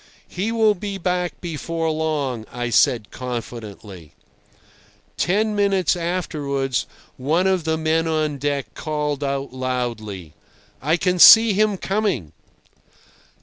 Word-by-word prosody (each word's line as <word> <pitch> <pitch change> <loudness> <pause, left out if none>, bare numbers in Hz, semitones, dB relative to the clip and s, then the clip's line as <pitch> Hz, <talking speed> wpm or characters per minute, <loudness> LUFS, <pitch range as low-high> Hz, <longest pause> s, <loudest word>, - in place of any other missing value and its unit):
"He 200 +5 -3
will 220 -2 +3
be 200 +1 -5
back 180 -1 -2
before 165 -1 -3
long," 145 -7 -2
I 120 -1 -4
said 115 -1 +2
confidently. 110 - -7 1.0
Ten 210 +4 +1
minutes 195 -4 +2
afterwards 145 - -2 0.3
one 160 +8 +1
of 190 -4 +1
the 160 0 0
men 160 +1 0
on 155 -3 -1
deck 140 -5 -2
called 150 -2 -3
out 140 -1 -3
loudly: 115 -10 -4 0.5
"I 155 +5 +1
can 180 +1 0
see 225 +3 +9
him 210 0 +2
coming." 190 - -1
155 Hz, 115 wpm, -21 LUFS, 125-180 Hz, 1.0 s, see